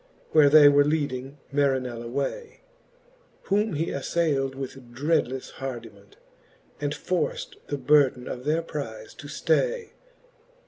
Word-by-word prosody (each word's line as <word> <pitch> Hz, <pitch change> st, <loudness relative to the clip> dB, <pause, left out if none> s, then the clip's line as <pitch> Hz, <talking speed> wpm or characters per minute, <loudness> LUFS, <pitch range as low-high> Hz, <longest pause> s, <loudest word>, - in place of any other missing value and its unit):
Where 150 Hz, -2 st, +6 dB
they 150 Hz, 0 st, +8 dB
were 145 Hz, 0 st, +6 dB
leading 140 Hz, -2 st, -2 dB, 0.2 s
Marinell 130 Hz, -4 st, 0 dB
away, 140 Hz, -, -4 dB, 0.8 s
Whom 205 Hz, +1 st, +1 dB
he 155 Hz, +3 st, -1 dB
aflayld 140 Hz, -2 st, 0 dB
with 135 Hz, -2 st, -8 dB
dreadlefle 130 Hz, -2 st, 0 dB
hardiment, 115 Hz, -6 st, -8 dB, 0.6 s
And 145 Hz, -1 st, -1 dB
forft 410 Hz, -, -2 dB
the 145 Hz, -, -2 dB
burden 135 Hz, -2 st, +3 dB
of 125 Hz, -, -5 dB
their 155 Hz, +4 st, +1 dB
prize 115 Hz, -9 st, -6 dB
to 145 Hz, -, -11 dB
ftay. 480 Hz, -, 0 dB
145 Hz, 120 wpm, -26 LUFS, 130-160 Hz, 0.8 s, they